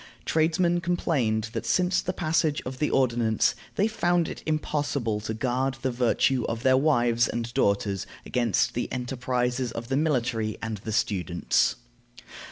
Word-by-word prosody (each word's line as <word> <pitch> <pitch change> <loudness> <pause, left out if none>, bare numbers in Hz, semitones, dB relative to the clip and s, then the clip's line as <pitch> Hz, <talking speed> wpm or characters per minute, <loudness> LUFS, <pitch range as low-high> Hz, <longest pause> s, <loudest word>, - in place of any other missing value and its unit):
Tradesmen 170 +2 +2
complained 125 -11 0
that - - -3
since 180 0 +2
the 185 - -2
passage 160 -3 0
of 130 0 -6
the 150 - +1
ordinance 120 -4 +2 0.2
they 205 - +2
found 175 -6 +1
it - - -7
impossible 145 -7 -1
to 110 +1 -4
guard 130 +2 -1
the 130 - +1
virtue 125 +1 +2
of 115 +1 -4
their 130 0 +5
wives 120 -5 +3
and 120 0 -4
daughters 100 -1 0 0.2
against 120 -6 +1
the 120 - -3
enterprises 125 0 -1
of 115 +1 -6
the 135 - +1
military 120 -8 0
and 115 -1 -4
the 110 +2 -6
students. 90 -5 +1
125 Hz, 150 wpm, -26 LUFS, 115-150 Hz, 0.2 s, their